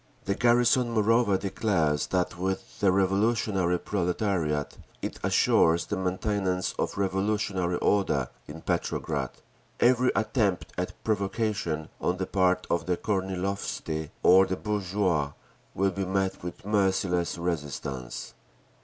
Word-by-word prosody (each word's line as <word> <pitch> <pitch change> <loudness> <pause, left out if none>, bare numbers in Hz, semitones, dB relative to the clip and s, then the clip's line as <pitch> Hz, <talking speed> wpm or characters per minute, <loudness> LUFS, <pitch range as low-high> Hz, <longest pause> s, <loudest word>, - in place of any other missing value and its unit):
The 100 - +1
garrison 120 +2 +3
moreover 110 -1 +3
declares 85 -7 0
that 90 -1 0
with 95 +2 -4
the 100 -2 +4
revolutionary 95 -1 +2
proletariat 90 -6 -1 0.2
it - - -4
assures 85 +1 +3
the 105 - -3
maintenance 95 0 -1
of - - -1
revolutionary 95 -2 0
order 100 -2 +1 0.2
in 80 +2 -9
Petrograd. - - -1 0.5
Every 125 +1 +4
attempt 110 -4 0
at 90 0 -3
provocation 100 -6 -1
on 90 - 0
the 95 - -2
part 90 -1 +2
of 85 - -1
the 90 -1 +1
Kornilovtsi 95 -5 -2
or 95 +1 +7
the 95 - -2
bourgeoisie 95 -8 0 0.4
will 95 +1 +2
be 95 +1 -3
met 95 0 -1
with 90 +1 -7
merciless 95 -4 +1
resistance. 75 -7 -4
95 Hz, 120 wpm, -27 LUFS, 90-105 Hz, 0.5 s, or